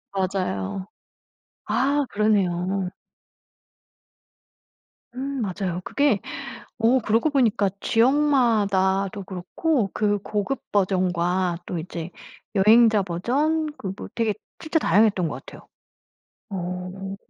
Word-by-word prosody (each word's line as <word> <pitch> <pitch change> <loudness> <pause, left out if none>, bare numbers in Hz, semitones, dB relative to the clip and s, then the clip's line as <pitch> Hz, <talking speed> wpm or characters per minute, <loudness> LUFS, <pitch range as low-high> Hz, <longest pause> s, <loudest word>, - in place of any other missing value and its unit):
맞아요. 140 - -2 0.8
아 275 +6 +1
그러네요. 195 -3 +1 2.3
음 270 +1 -3
맞아요. 185 -3 -2
그게 280 -4 +2 0.6
어 235 +3 +4
그러고 225 +5 +2
보니까 225 -8 +2
지역 230 +5 +3
마다도 205 -8 +2
그렇고 195 - -1
그 205 -1 +1
고급 210 +6 -2
버전과 180 -2 +1
또 180 - -4
이제 170 0 -5 0.5
여행자 215 +1 +6
버전 280 - 0
그 190 -2 -5
뭐 - - -8
되게 225 -2 +1 0.3
진짜 320 +1 0
다양했던 195 - +3
것 - - -7
같아요. - - -13 0.8
어. 185 +1 -5
200 Hz, 200 characters per minute, -24 LUFS, 185-235 Hz, 2.3 s, 여행자